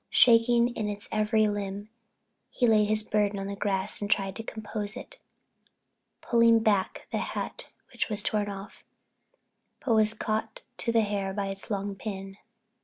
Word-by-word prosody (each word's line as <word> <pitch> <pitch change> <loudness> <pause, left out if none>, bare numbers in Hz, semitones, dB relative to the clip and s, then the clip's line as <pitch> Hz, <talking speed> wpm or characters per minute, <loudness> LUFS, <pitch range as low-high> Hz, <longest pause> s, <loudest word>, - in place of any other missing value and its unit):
Shaking 235 0 +5
in 210 -4 -3
every 215 0 +2
limb 205 0 -4 0.6
he 250 - +1
laid 215 -2 +5
his 215 +1 +1
burden 205 -1 +1
on 195 - -4
the 200 0 -4
grass 200 0 -2
and 205 - -3
tried 195 -1 +1
to - - -4
compose 215 -1 -5
it, - - -10 1.0
putting 230 -1 +5
back 205 -4 +1
the - - 0
hat - - -4 0.2
which - - -2
was 210 -1 0
torn 210 -1 0
off, 200 0 -9 1.0
but 240 - +3
was 215 0 +3
caught 220 0 -3
to 230 - -1
the 230 -1 +4
hair 200 -2 -2
by 200 -1 -2
its 195 +3 -7
long 200 -1 -2
pin. 195 -1 -6
210 Hz, 160 wpm, -28 LUFS, 200-220 Hz, 1.0 s, Shaking